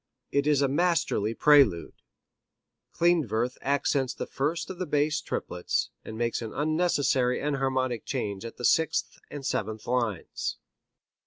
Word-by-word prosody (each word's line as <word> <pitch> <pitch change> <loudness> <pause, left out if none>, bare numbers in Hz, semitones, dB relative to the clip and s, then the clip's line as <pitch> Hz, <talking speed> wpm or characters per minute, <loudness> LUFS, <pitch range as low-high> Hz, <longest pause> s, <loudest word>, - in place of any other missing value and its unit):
It 140 +1 +1
is 145 -2 +3
a - - +3
masterly 150 - +1
prelude. 140 - +4 1.0
Klindworth 130 -9 +1
accents 140 -1 0
the - - -4
first 160 +6 -2
of 185 - -9
the 185 - -2
bass 150 +1 +1
triplets, 90 0 -2
and 110 - -8
makes 120 0 -1
an 110 -2 -5
unnecessary 145 -5 +1
enharmonic 130 -4 -1
change 100 -1 -3
at 115 - -8
the 120 - -3
sixth 160 0 +1
and 145 -2 -7
seventh 110 -1 -2
lines. 120 -7 -2
135 Hz, 135 wpm, -27 LUFS, 115-150 Hz, 1.0 s, prelude